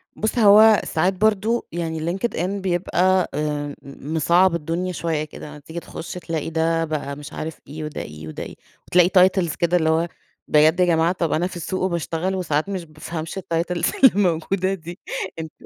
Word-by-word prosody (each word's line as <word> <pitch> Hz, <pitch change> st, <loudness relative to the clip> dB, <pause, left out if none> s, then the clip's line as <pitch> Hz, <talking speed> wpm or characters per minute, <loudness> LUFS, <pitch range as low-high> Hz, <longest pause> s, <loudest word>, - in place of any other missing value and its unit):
بُص 220 Hz, +3 st, -2 dB
هو 215 Hz, 0 st, +7 dB
ساعات 180 Hz, +4 st, +1 dB
برضه 215 Hz, +4 st, +1 dB
يعني 165 Hz, -1 st, -3 dB, 0.2 s
LinkedIn 195 Hz, -5 st, -1 dB, 0.2 s
بيبقى 185 Hz, 0 st, +1 dB
آآ 145 Hz, 0 st, -2 dB
مصعّب 165 Hz, +6 st, +1 dB
الدنيا 170 Hz, +3 st, -2 dB
شويّة 165 Hz, -3 st, -2 dB
كده، 150 Hz, 0 st, -9 dB
أما 150 Hz, 0 st, -10 dB
تيجي 160 Hz, +4 st, -7 dB
تخش 165 Hz, -, -8 dB
تلاقي 165 Hz, -3 st, -4 dB
ده 165 Hz, 0 st, +1 dB
بقى 145 Hz, -3 st, -4 dB
مش 145 Hz, +1 st, -10 dB
عارف 160 Hz, 0 st, -5 dB
إيه، 155 Hz, +3 st, -7 dB
وده 150 Hz, 0 st, -5 dB
إيه، 75 Hz, +1 st, -9 dB
وده 80 Hz, -, -6 dB
إيه، -, -, -9 dB, 0.3 s
وتلاقي 180 Hz, 0 st, +5 dB, 0.2 s
titles 180 Hz, -5 st, -2 dB
كده 175 Hz, +1 st, +2 dB
اللي 160 Hz, -2 st, +1 dB
هو 165 Hz, +2 st, +2 dB, 0.4 s
بجد 155 Hz, +3 st, +4 dB
يا 180 Hz, -, +5 dB
جماعة، 165 Hz, -1 st, +3 dB
طب 170 Hz, -4 st, -1 dB
أنا 175 Hz, +3 st, +1 dB
في 185 Hz, -, -10 dB
السوق 185 Hz, +2 st, -3 dB
وباشتغل 170 Hz, +1 st, -1 dB
وساعات 160 Hz, -2 st, -1 dB
مش 190 Hz, -3 st, -4 dB
بافهمش 160 Hz, +3 st, -6 dB
الtitles 170 Hz, -2 st, -1 dB, 0.4 s
اللي 265 Hz, -, +9 dB
الموجودة 185 Hz, 0 st, +1 dB
دي، 175 Hz, -1 st, -8 dB, 0.4 s
أنت 160 Hz, -1 st, -6 dB
170 Hz, 175 wpm, -22 LUFS, 155-185 Hz, 0.4 s, اللي